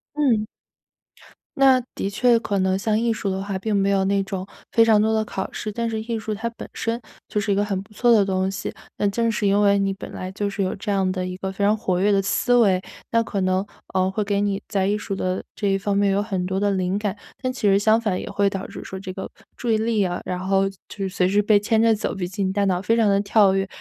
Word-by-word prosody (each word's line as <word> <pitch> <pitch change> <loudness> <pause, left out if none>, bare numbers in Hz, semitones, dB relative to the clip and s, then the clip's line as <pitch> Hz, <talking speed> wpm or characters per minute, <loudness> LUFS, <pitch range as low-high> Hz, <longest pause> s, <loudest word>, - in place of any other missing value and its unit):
嗯。 245 -8 +2 1.1
那 265 -2 +6
的 - - -2
确 235 +4 +3
可 200 -3 -1
能 190 0 +2
像 215 +2 0
艺 235 0 +1
术 215 -3 -2
的 190 - -2
话 195 -1 -3
并 210 +2 -1
没 195 0 +2
有 195 -1 +2
那 200 0 +2
种 195 -1 -4 0.3
非 230 - +5
常 220 -2 +5
多 220 +1 +2
的 220 0 +1
考 190 -2 -4
试， 215 - -4
但 230 +2 -2
是 220 -1 -2
艺 230 0 -3
术 220 0 -5
它 225 +3 -3
本 230 - -10
身 230 +1 -2 0.3
就 210 - -1
是 205 0 -1
一 - - +3
个 205 +1 +1
很 195 -2 -2
不 200 - -17
错 240 +4 +3
的 220 -3 +6
东 190 -1 0
西。 195 - -4 0.3
那 205 - +2
正 230 +3 +1
是 210 -1 0
因 200 +1 +3
为 200 -1 +4
你 195 0 +1
本 195 - -8
来 185 0 -6
就 205 +1 -2
是 200 - -3
有 185 - -1
这 200 +1 -4
样 190 -2 +1
的 185 -1 -2
一 180 0 -4
个 190 0 -4
非 200 +1 -1
常 210 +1 +4
活 185 -4 -1
跃 205 +2 +3
的 200 -1 +3
思 245 +5 +1
维， 195 -6 +4 0.3
那 230 0 +2
可 200 -3 -3
能， 185 +1 +1 0.3
呃， 185 0 +3
会 210 +2 -1
给 200 0 0
你 200 -1 0
在 195 -2 +1
艺 205 +2 +1
术 200 - -4
的 185 -1 -2
这 205 - -1
一 195 0 +1
方 200 +1 0
面 200 -1 +3
有 195 +1 +2
很 195 -4 -2
多 190 +1 -1
的 205 0 +2
灵 185 -1 0
感。 210 -1 -2 0.2
但 255 -1 -1
其 255 - -9
实 195 0 +5
相 220 +2 +4
反 210 -5 -1
也 - - -7
会 200 0 +1
导 195 -1 -3
致 - - -9
说 190 - -7
这 190 -1 -6
个 190 +1 -6 0.3
注 240 - -2
意 220 - +3
力 220 -2 +1
啊， 180 -2 -2
然 180 0 -3
后 195 +1 +1
就 195 - -15 0.2
是 195 - -1
随 180 -1 +1
时 205 +2 +3
被 210 0 +4
牵 220 +2 +2
着 225 -1 +4
走， 210 - -3
毕 185 -3 -3
竟 195 +1 -2
你 - - -2
大 200 0 +1
脑 185 -2 +1
非 225 +4 +2
常 225 -3 +3
地 200 0 +3
跳 200 -1 +4
跃， 195 0 0
200 Hz, 300 characters per minute, -23 LUFS, 190-220 Hz, 1.1 s, 那